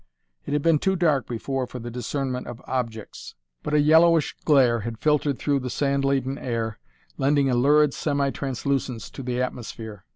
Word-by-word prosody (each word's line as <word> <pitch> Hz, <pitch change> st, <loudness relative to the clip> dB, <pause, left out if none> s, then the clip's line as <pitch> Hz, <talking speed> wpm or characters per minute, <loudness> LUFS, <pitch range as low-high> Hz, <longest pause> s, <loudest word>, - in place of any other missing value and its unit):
It -, -, -2 dB
had 145 Hz, -1 st, 0 dB
been 165 Hz, -3 st, +4 dB
too 190 Hz, +4 st, +1 dB
dark 155 Hz, -7 st, +1 dB
before 125 Hz, +2 st, -3 dB
for 125 Hz, -, -8 dB
the 120 Hz, 0 st, -7 dB
discernment 125 Hz, +2 st, -3 dB
of 120 Hz, -, -7 dB
objects, 115 Hz, -4 st, -5 dB, 0.3 s
but 150 Hz, -, -2 dB
a -, -, +5 dB
yellowish 160 Hz, +2 st, +4 dB
glare 130 Hz, -6 st, +4 dB
had 115 Hz, +1 st, -5 dB
filtered 150 Hz, 0 st, +1 dB
through 145 Hz, -2 st, 0 dB
the 125 Hz, -1 st, -4 dB
sand 140 Hz, +2 st, 0 dB
laden 135 Hz, 0 st, 0 dB
air, 115 Hz, -3 st, -3 dB, 0.4 s
lending 140 Hz, 0 st, +2 dB
a -, -, +2 dB
lurid, 145 Hz, +3 st, +4 dB
semi 140 Hz, -2 st, 0 dB
translucence 135 Hz, -3 st, -3 dB
to -, -, -8 dB
the 125 Hz, -1 st, -3 dB
atmosphere. 115 Hz, -5 st, -5 dB
135 Hz, 175 wpm, -24 LUFS, 120-145 Hz, 0.4 s, a